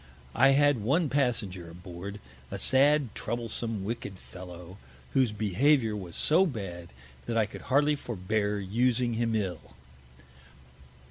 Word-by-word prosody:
I 135 +3 +5
had 145 -5 +4
one 145 - +2
Passenger 110 -11 0
aboard, 90 +3 -8 0.3
a - - -4
sad 140 -2 +4
troublesome 115 -2 -3
wicked 105 -2 -5
Fellow, 90 0 -11 0.3
whose 130 -4 +3
Behaviour 110 +3 +2
was 90 -5 -7
so 180 +5 +3
bad, 90 - -6 0.4
that 115 - -1
I 110 - +4
could 105 - -10
hardly 145 +2 +4
forbear 105 -4 -2
using 120 +4 +1
him 115 0 0
ill. 95 -5 -3
110 Hz, 125 wpm, -29 LUFS, 95-130 Hz, 0.4 s, I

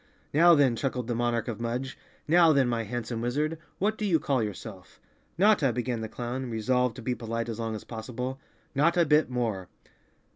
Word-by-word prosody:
"Now 170 +3 +7
then," 135 -5 +4
chuckled 125 +1 -2
the 120 - -2
monarch 120 0 0
of 115 -2 -4
Mudge, 125 +3 -3 0.3
"now 165 +1 +6
then, 135 -3 +3
my 115 -2 -1
handsome 115 +1 -4
wizard, 150 +7 -1 0.2
what 215 +3 0
do 215 - -1
you 170 -5 +3
call 135 -4 0
yourself?" 105 -2 -7 0.4
"Notta," 185 - +4
began 120 -1 -2
the 110 - -5
clown, 125 +2 -4
resolved 125 +2 0
to 125 - -9
be 125 - 0
polite 115 -1 -4
as 115 -1 -5
long 115 -1 -2
as 105 - -7
possible, 125 +3 -5 0.3
"Notta 170 +4 +3
Bit 150 -1 +3
More." 110 -7 -2
125 Hz, 185 wpm, -28 LUFS, 115-145 Hz, 0.4 s, Now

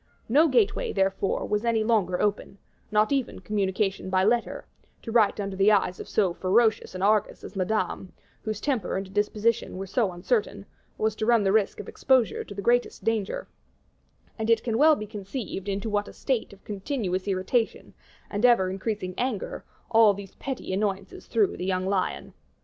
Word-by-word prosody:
No 295 +8 +5
gateway, 240 -8 +2
therefore, 195 0 0
was 210 +1 0
any 230 -2 +1
longer 205 -6 +1
open 205 -1 -1 0.3
not 215 +2 +2
even 275 -3 -1
communication 195 0 -1
by 185 0 +2
letter; 235 +3 0 0.4
to 225 - -5
write 220 -3 +3
under 195 -1 -3
the 195 +2 +4
eyes 185 -3 +2
of - - -8
so 195 -5 +2
ferocious 215 +3 +1
an 185 - -3
Argus 210 0 +1
as - - -9
Madame, 185 -1 -1 0.3
whose 215 -2 -4
temper 240 -9 -1
and 190 0 -6
disposition 210 +1 0
were 195 - -4
so 200 +1 0
uncertain, 200 +3 -1 0.3
was 220 0 0
to 215 - -2
run 235 -3 +4
the 195 - +2
risk 215 -1 +1
of - - -7
exposure 260 -4 +1
to 200 - -10
the 200 - -5
greatest 245 +2 +1
danger; 220 -3 -1 0.9
and 220 0 -2
it 230 -1 +4
can 230 -1 -1
well 310 +1 +7
be 215 - -5
conceived 205 -1 -6
into 200 +2 -2
what 205 -1 -1
a - - -10
state 255 -5 -2
of 200 -1 -16
continuous 200 -3 -3
irritation, 200 +5 -1 0.3
and 205 +2 -4
ever 235 -7 +5
increasing 195 -1 -3
anger, 245 -5 -3 0.3
all 220 -3 +6
these 200 -1 -10
petty 265 -8 -5
annoyances 195 -1 -3
threw 215 -4 +2
the - - -6
young 185 -1 0
lion. 190 -1 -2
210 Hz, 180 wpm, -26 LUFS, 195-225 Hz, 0.9 s, well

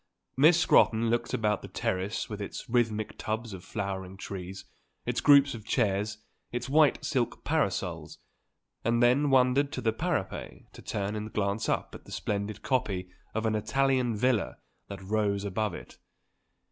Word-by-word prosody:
Miss 155 +5 +6
Scrotton 115 -9 +4
looked 120 - 0
about 105 -2 0
the - - -8
terrace 95 +4 -2
with 105 -1 -6
its 100 - -6
rhythmic 115 -3 0
tubs 110 0 -3
of 90 -2 -8
flowering 95 -2 -4
trees, 95 0 -7 0.4
its - - -1
groups 140 -1 +6
of 115 -2 -8
chairs, 105 -2 0 0.3
its 120 - -3
white 150 +2 +3
silk 125 -6 -1
parasols, - - -1 0.7
and 115 +1 +2
then 135 +4 +4
wandered 135 +2 +3
to - - -3
the 110 -2 +1
parapet 145 - -4
to - - -12
turn 100 +1 -3
and 105 0 -5
glance 100 +1 -1
up - - -1
at - - -11
the - - -13
splendid 100 0 -3
copy 95 -8 -1 0.2
of 110 0 -1
an 110 - +1
Italian 130 +2 +1
villa 120 -1 +1 0.3
that 100 -1 -8
rose 100 0 0
above 100 -1 -1
it. - - -11
110 Hz, 160 wpm, -29 LUFS, 100-125 Hz, 0.7 s, Miss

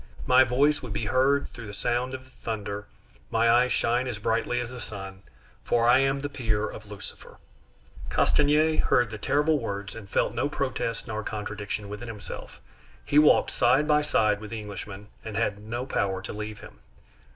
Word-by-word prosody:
My 130 +1 +7
voice 140 +4 +3
could 125 -5 -6
be 105 - -2
heard 130 +6 +2
through 115 -3 -8
the 100 - -7
sound 125 +4 -1
of 130 - -9
the 130 - -21
thunder, 105 -4 -5 0.4
my 115 0 +2
eyes 125 +1 +4
shine 120 +2 +1
as 120 -4 -3
brightly 115 +3 0
as 120 0 -4
the 125 - -7
sun, 95 -3 -7 0.4
for 120 -1 +2
I 125 +2 +7
am 135 0 +2
the 145 - -2
peer 110 -6 -1
of 110 - -9
Lucifer!" 105 -1 -10 0.7
Castanier 155 +2 +3
heard 120 -3 +3
the 105 - -6
terrible 150 +7 +2
words, 100 -3 -4
and 105 -3 -10
felt - - +1
no 120 +4 0
protest 130 -5 -2
nor 110 0 -3
contradiction 105 -1 -4
within 105 +4 -7
himself. 110 -3 -8 0.5
He 145 - +4
walked 150 - +5
side 130 +5 +3
by 150 -1 +4
side 110 -8 +2
with 105 - -7
the 115 - -4
Englishman, 100 -1 -8
and 110 -2 -5
had 105 -3 0
no 120 +4 -4
power 95 -7 -1
to - - -6
leave 105 0 -6
him. - - -13
115 Hz, 185 wpm, -27 LUFS, 105-130 Hz, 0.7 s, My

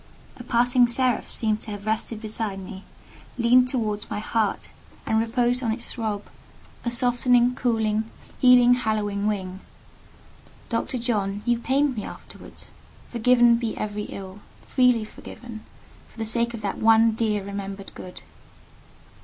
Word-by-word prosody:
A 245 - -9
passing 245 +1 +3
seraph 250 +1 +1
seemed 215 -2 0
to - - -6
have 205 0 -7
rested 220 0 -2
beside 215 -2 -3
me, 190 0 -9 0.5
leaned 250 +1 +4
towards 215 -5 -2
my - - -3
heart, 215 0 -1 0.3
and 220 - +2
reposed 240 +2 +1
on 230 -3 0
its 235 +2 -5
throb 215 -3 -3 0.6
a 240 - -1
softening, 245 0 +3
cooling, 220 -3 0 0.3
healing, 245 -1 +7
hallowing 210 -4 -1
wing. 190 -3 -3 1.1
Dr. 235 +2 -2
John, 210 -4 -2
you 240 -1 +2
pained 270 +2 +1
me 215 - -4
afterwards: - - -11 0.4
forgiven 240 0 +4
be 230 -2 -3
every 210 0 -3
ill—freely 215 +5 -1
forgiven—for 220 +1 -13
the 225 - -3
sake 235 +1 0
of 225 - -8
that 200 -2 -3
one 225 0 +5
dear 215 -2 -1
remembered 195 0 -7
good! 180 - -10
225 Hz, 135 wpm, -24 LUFS, 210-245 Hz, 1.1 s, healing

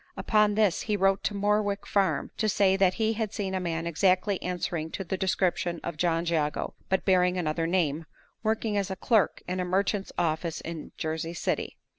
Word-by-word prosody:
Upon 210 -1 +3
this 210 -5 +2
he 210 - +2
wrote 195 +1 +2
to 205 - 0
Morwick 205 0 +1
Farm 195 -2 +1
to 215 - +1
say 190 -1 +3
that 190 -1 +3
he 220 -1 +1
had 220 -2 -2
seen 200 -3 -3
a 190 - 0
man 165 -2 -2
exactly 185 +3 +2
answering 175 -3 -3
to 195 - -3
the 190 - -3
description 185 -2 0
of 170 - -4
John 165 +1 +1
Jago, 155 -3 -1 0.2
but 190 - +1
bearing 180 -1 +3
another 165 -1 -1
name, 165 -3 0 0.3
working 220 -1 0
as 200 -1 0
a 190 - -3
clerk 215 +2 +1
in 185 +1 -2
a - - +1
merchant's 195 +2 0
office 165 -1 -1
in 165 -2 -7
Jersey 160 +1 -3
City. - - -2
185 Hz, 190 wpm, -28 LUFS, 170-200 Hz, 0.3 s, Upon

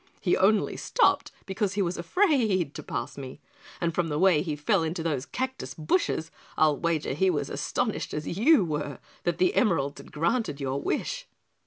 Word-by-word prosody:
He 175 - +2
only 200 +2 +2
stopped - - +2
because 195 0 -1
he 205 - 0
was 175 0 -1
afraid 215 - +2
to - - -6
pass 145 - -5
me, 130 +1 -8 0.4
and 170 -1 0
from 175 0 0
the 150 -2 -2
way 180 -3 +4
he 155 -3 -2
fell 165 +6 +1
into 160 +1 -2
those 145 -4 -2
cactus 260 - -4
bushes, 160 0 0 0.3
I'll 155 -2 +4
wager 165 -3 -1
he 190 +7 +2
was 145 -5 -1
as - - -4
astonished - - -1
as 150 - -4
you 225 - +4
were 150 -3 -3 0.3
that 175 -1 +1
the 180 0 +3
emeralds 165 - +1
had - - -16
granted 165 - 0
your 135 0 -2
wish." - - -2
170 Hz, 185 wpm, -27 LUFS, 150-195 Hz, 0.4 s, way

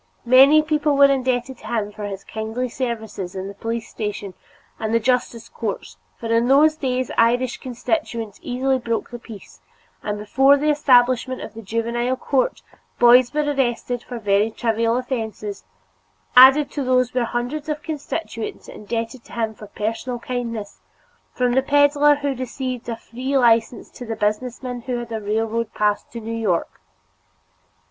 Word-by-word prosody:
Many 270 +5 +7
people 300 -2 +1
were 280 0 +7
indebted 255 -1 -1
to - - -11
him 215 -3 -2
for 210 0 -7
his 195 -1 -6
kindly 220 +4 -4
services 220 -7 -4
in 190 0 -4
the 200 - -7
police 230 +3 -4
station 210 -2 -5 0.5
and 220 +1 -1
the - - +4
justice 245 -1 -1
courts, 200 - -5 0.2
for - - -9
in 230 +1 +3
those 300 +4 +5
days 255 -4 -2
Irish 245 +2 +2
constituents 240 -4 -3
easily 260 +1 0
broke 230 -2 -3
the 240 - -7
peace, 195 - -13 0.4
and 210 - -3
before 270 +7 +4
the 300 +2 +2
establishment 255 -3 +3
of 215 - -8
the 225 - -9
Juvenile 235 +4 -1
Court, 275 - 0 0.3
boys 245 +1 +6
were 300 0 0
arrested 250 -4 -1
for 245 - -7
very 205 0 +2
trivial 230 +1 0
offenses; 220 - -4 0.7
added 265 +3 +8
to 285 - -3
these 255 -1 +2
were 250 -1 +1
hundreds 250 +7 -3
of 300 0 -3
constituents 300 -6 -5
indebted 230 +3 -5
to - - -15
him 225 -2 -2
for 210 0 -12
personal 225 +4 -3
kindness, 235 -4 -5 0.5
from 250 -1 0
the 265 - +4
peddler 290 +1 +4
who 285 -1 -2
received 255 -1 -5
a 230 - -2
free 255 +4 -3
license 230 -1 +2
to - - -10
the 225 - -3
businessman 245 +4 -2
who 245 0 -3
had 240 -1 -6
a 220 -1 -3
railroad 220 +2 -1
pass 210 -1 +1
to 235 - -9
New 225 0 -6
York. 210 - -1
240 Hz, 160 wpm, -22 LUFS, 225-260 Hz, 0.7 s, added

